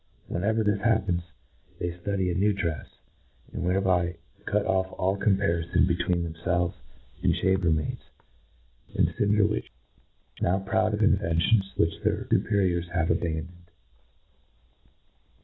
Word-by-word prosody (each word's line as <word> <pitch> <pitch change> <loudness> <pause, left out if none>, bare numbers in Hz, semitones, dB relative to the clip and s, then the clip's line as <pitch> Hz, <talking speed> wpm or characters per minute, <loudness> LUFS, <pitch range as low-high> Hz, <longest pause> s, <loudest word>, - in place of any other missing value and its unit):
Whenever 110 +5 0
this 105 -1 +1
happens, 100 -5 +2 0.6
they 90 - -2
ftudy 95 +1 -2
a - - -1
new 100 +4 +2
drefs 85 -8 -3 0.7
—and - - -3
thereby 90 -2 +1 0.3
cut 105 0 +1
off 95 0 0
all 95 +1 +1
comparifon 90 -3 +2
between 85 0 0
themfelves 85 +1 0 0.5
and - - +2
chamber 95 -2 +2
maids 80 -2 -1 0.9
and - - +2
cinder 105 0 +3
winches, 105 0 -2 0.7
now 90 +2 +2
proud 100 +2 +1
of 105 - 0
inventions 95 0 +2
which 80 0 +1
their - - -1
fii - - +2
periors 90 -4 +1
have 85 -2 0
abandoned. 85 +1 -3
90 Hz, 125 wpm, -27 LUFS, 85-100 Hz, 0.9 s, cinder